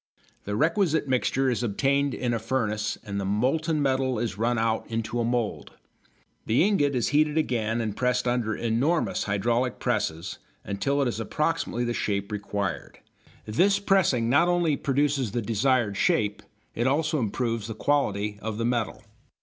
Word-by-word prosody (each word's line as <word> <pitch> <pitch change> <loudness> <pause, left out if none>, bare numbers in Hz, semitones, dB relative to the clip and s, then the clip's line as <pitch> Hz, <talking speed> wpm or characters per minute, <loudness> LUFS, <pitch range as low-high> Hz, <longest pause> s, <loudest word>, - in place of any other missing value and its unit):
The 105 - -2
requisite 160 - +2
mixture 130 +1 +1
is 120 - -1
obtained 135 +5 +1
in 120 -2 -1
a 115 - 0
furnace 110 -3 -1
and 100 -2 -4
the - - -2
molten 140 - 0
metal 130 -2 +1
is 110 -2 -2
run 115 +3 0
out 110 0 0
into 115 +1 -3
a - - +1
mould. 115 - -2 0.7
The 115 +8 +4
ingot 160 -9 +2
is 120 - +1
heated 150 +1 +2
again 115 -7 0
and 110 -3 -3
pressed 125 0 0
under 120 -3 0
enormous 125 +9 0
hydraulic 120 +5 0
presses 100 -8 -2 0.2
until 140 +9 0
it - - 0
is 115 - -3
approximately 150 0 -1
the 120 0 -1
shape 100 -2 -2
required. 100 -2 -3 0.5
This 185 - +3
pressing 190 - +2
not 140 +8 +4
only 175 -4 +2
produces 140 -5 0
the 120 - 0
desired 115 -1 +1
shape, 105 +1 +1 0.3
it 120 +2 0
also 155 +3 +1
improves 115 -1 -2
the 110 - -5
quality 105 -6 0
of 110 -1 -4
the 115 - -1
metal. 120 -3 -1
120 Hz, 160 wpm, -26 LUFS, 110-140 Hz, 0.7 s, The